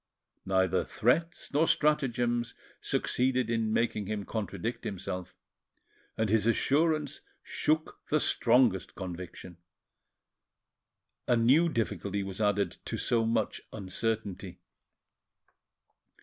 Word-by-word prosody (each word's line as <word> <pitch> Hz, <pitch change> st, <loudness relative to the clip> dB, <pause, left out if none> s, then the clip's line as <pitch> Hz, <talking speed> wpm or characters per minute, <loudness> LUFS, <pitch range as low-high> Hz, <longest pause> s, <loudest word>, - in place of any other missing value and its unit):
Neither 95 Hz, -1 st, +2 dB
threats 165 Hz, +10 st, 0 dB
nor 155 Hz, +3 st, +3 dB
stratagems 120 Hz, -5 st, +1 dB, 0.3 s
succeeded 125 Hz, -2 st, 0 dB
in 115 Hz, -2 st, 0 dB
making 110 Hz, -3 st, 0 dB
him 105 Hz, -1 st, -3 dB
contradict 110 Hz, +1 st, -4 dB
himself, 90 Hz, -2 st, -5 dB, 0.8 s
and 110 Hz, -, +1 dB
his 110 Hz, +1 st, +2 dB
assurance 150 Hz, +4 st, +1 dB, 0.2 s
shook 155 Hz, +1 st, -1 dB
the 155 Hz, -, +3 dB
strongest 120 Hz, -8 st, +3 dB
conviction. 90 Hz, -1 st, -7 dB, 1.7 s
A 120 Hz, -, +4 dB
new 135 Hz, +9 st, +4 dB
difficulty 100 Hz, -, -2 dB
was 95 Hz, +2 st, -6 dB
added 100 Hz, -3 st, +1 dB
to -, -, -3 dB
so 115 Hz, -2 st, +1 dB
much 115 Hz, -2 st, 0 dB
uncertainty. 105 Hz, 0 st, -3 dB
115 Hz, 95 wpm, -30 LUFS, 100-125 Hz, 1.7 s, A